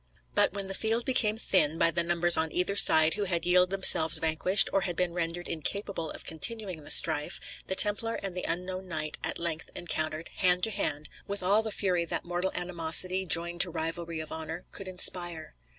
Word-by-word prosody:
But - - +1
when 200 -1 -5
the 195 - -6
field 225 +4 -1
became 220 -4 +1
thin, 165 -7 +1
by 165 - +2
the 170 - -1
numbers 175 0 +2
on 160 0 -2
either 180 +3 -1
side 160 -5 +6
who 205 -1 -3
had 170 -3 -2
yielded 180 +1 +3
themselves 185 -4 +3
vanquished 165 +5 +3
or 195 - +1
had 175 -2 -4
been 180 -1 -2
rendered 175 0 -4
incapable 165 +1 -4
of - - -10
continuing 185 -1 0
the - - -9
strife, 150 - +1 0.3
the 190 - -2
Templar 210 +3 +3
and 190 -2 -6
the 180 - -5
unknown 185 +2 -5
knight 155 -3 -4
at - - -1
length 165 -2 -3
encountered, 155 -1 -2
hand 180 -1 +2
to 220 - +1
hand, 150 -6 -2 0.2
with 200 -1 0
all 200 +4 +2
the 220 -1 -5
fury 180 -4 -1
that - - -5
mortal 175 +2 -3
animosity, 180 +2 +2
joined 170 +2 +2
to 180 - +4
rivalry 165 0 -6
of 155 - -8
honour, 160 +2 -7
could 195 - -8
inspire. 175 - +2
175 Hz, 200 wpm, -27 LUFS, 165-190 Hz, 0.3 s, side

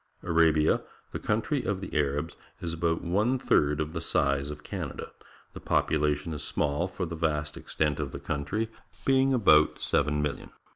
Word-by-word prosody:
— - - -35
Arabia, 80 -2 +3 0.3
the - - -4
countrj' 115 +7 0
of 100 -3 0
the 95 - -7
Arabs, 75 +2 0 0.2
is 85 -1 -4
about 85 0 0
one 105 +9 +1
third 75 - +2
of 75 +1 -2
the 85 - -3
size 70 -3 +1
of 75 - -8
Canada. - - -5 0.4
The - - -8
population 75 +1 +1
is 75 - -5
small 75 +5 -1
for 90 0 -4
the 85 0 -5
vast 75 -2 -1
extent 75 -1 -1
of 70 -3 -3
country, 80 +10 -2 0.4
being 135 0 +4
about 85 -12 +5
seven 75 +1 +1
million. 75 -1 -3
80 Hz, 165 wpm, -28 LUFS, 75-90 Hz, 0.4 s, about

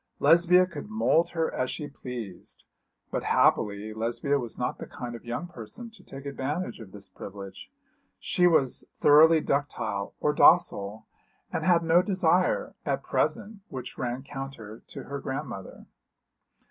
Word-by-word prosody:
Lesbia 175 +4 +5
could 175 +1 -8
mould 215 -6 +2
her 165 -1 -1
as 130 - -1
she 150 - -4
pleased; 120 -9 -8 0.5
but - - -1
happily 105 +1 +2
Lesbia 120 +6 0
was 120 -3 -6
not 125 - -2
the - - -7
kind 120 -1 -7
of 115 - -9
young 120 +7 -4
person 175 - -9
to 225 - -14
take 135 +1 -10
advantage 140 +6 -3
of 105 -4 -11
this 100 -1 -10
privilege; 95 0 -10 0.5
she 180 - +2
was 140 -7 +2
thoroughly 155 +2 +6
ductile 140 -9 -2
or 150 - +1
docile, 110 - +4 0.5
and - - -1
had 175 -2 +4
no 165 +2 +5
desire, 205 - +1
at - - -1
present, 210 0 -1
which 130 -3 -7
ran 125 +1 -3
counter 135 -6 -8
to - - -8
her 140 0 -5
grandmother. 130 -9 -6
140 Hz, 145 wpm, -27 LUFS, 115-165 Hz, 0.5 s, thoroughly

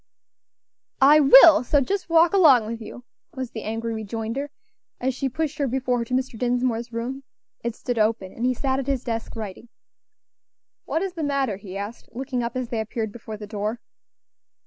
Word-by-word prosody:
"I 290 +3 +7
will! 290 +2 +8
so 290 +4 +3
just 375 +7 -2
walk 330 +2 +5
along 290 - +6
with 230 +1 -5
you," 235 +3 -9 0.3
was 260 -2 -5
the 220 - -6
angry 225 +1 -3
rejoinder, 225 +5 -4 0.5
as 260 +1 0
she 270 +1 -2
pushed 305 +2 -3
her 280 - +1
before 250 -1 0
her 235 - -2
to 250 - -2
Mr. 255 -3 -2
Dinsmore's 245 -1 0
door. 240 +3 -4 0.4
It 235 -1 -3
stood 245 -2 -3
open, 215 -3 0
and 230 - -6
he 255 0 +2
sat 265 +1 -1
at 270 - -4
his 270 -3 -1
desk, 230 -1 -4
writing. 220 +1 -7 1.2
"What 325 - -1
is 385 -2 -3
the 335 - -5
matter?" 275 -8 0
he 195 -1 -8
asked, 205 +4 -7
looking 255 0 -3
up 235 +1 -4
as 250 -2 -3
they 230 - -2
appeared 220 0 -3
before 220 -1 -8
the 210 - -8
door. 210 +2 -3
245 Hz, 190 wpm, -24 LUFS, 225-270 Hz, 1.2 s, will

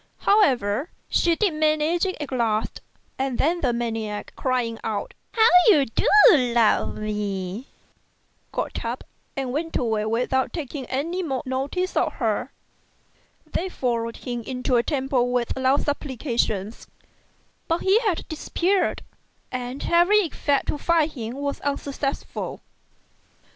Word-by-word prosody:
However, 270 - +3 0.2
she 340 -1 +3
did 400 -2 +1
manage 310 +3 +2
it 370 - -3
at 295 -2 -5
last, 225 -4 -1 0.4
and 265 -2 -1
then 340 +4 +1
the 255 - +2
maniac 225 -3 -3
crying 245 -3 -1
out, 210 -2 -3
" - - -45
How 445 - +8 0.2
you 305 -11 +6
do 225 - -1 0.3
love 240 -6 +2
me! 210 +1 -3 0.4
" - - -42
got - - -3
up - - -4 0.3
and 260 -2 -2
went 325 +3 -1
away 220 -3 0
without 250 +4 0
taking 280 -5 -5
any 330 +8 -2
more 270 -7 -2
notice 275 +8 -2
of - - +1
her. - - -1 0.9
They 375 +3 -3
followed 230 -7 -2
him 240 -2 -4
into 250 +2 -1
a 235 - +5
temple 260 -2 0
with 245 -1 0
loud 265 +2 +2
supplications, 240 -7 -2 0.8
but 330 0 0
he 390 +3 +5
had 415 -8 -1
disappeared, 355 +4 0 0.5
and 250 +2 -4
every 355 +5 +5
effort 285 -2 0
to 295 - -2
find 325 -1 +2
him 235 -4 -6
was 280 0 -3
unsuccessful. 280 0 -3
265 Hz, 135 wpm, -24 LUFS, 235-315 Hz, 0.9 s, How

